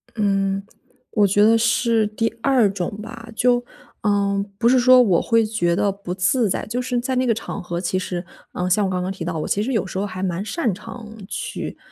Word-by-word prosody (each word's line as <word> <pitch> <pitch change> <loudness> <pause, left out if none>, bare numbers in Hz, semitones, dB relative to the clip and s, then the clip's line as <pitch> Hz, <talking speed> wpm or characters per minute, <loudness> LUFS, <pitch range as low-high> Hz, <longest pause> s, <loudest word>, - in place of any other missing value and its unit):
嗯， 195 -2 +1 0.5
我 205 -2 +3
觉 205 +2 +3
得 225 +2 +6
是 230 0 +2
第 225 +2 -1
二 250 -5 +4
种 195 0 -4
吧。 230 +1 -9
就， 245 +1 +2 0.4
呃， 200 -1 +1
不 235 +2 +3
是 255 +1 +5
说 255 +1 +7
我 190 -8 +3
会 230 -1 +2
觉 190 -6 0
得 200 +2 +1
不 195 -2 -6
自 200 +5 +2
在， - - -2
就 240 +4 -2
是 250 -1 -1
在 255 +2 -2
那 255 +1 +1
个 235 - +3
场 215 -2 -5
合， 175 -1 -4
其 185 +1 -1
实， 180 -1 -3 0.3
呃， 180 0 -2
像 205 +3 +3
我 190 - -1
刚 180 -1 -1
刚 185 +1 -2
提 185 -3 -6
到， 170 -1 -3
我 - - -3
其 205 - 0
实 260 +4 -2
有 220 - +1
时 185 - -6
候 195 - 0
还 185 -2 -6
蛮 185 0 -2
擅 240 - -1
长 225 +4 -9 0.2
去， - - -5
210 Hz, 240 characters per minute, -22 LUFS, 190-230 Hz, 0.5 s, 说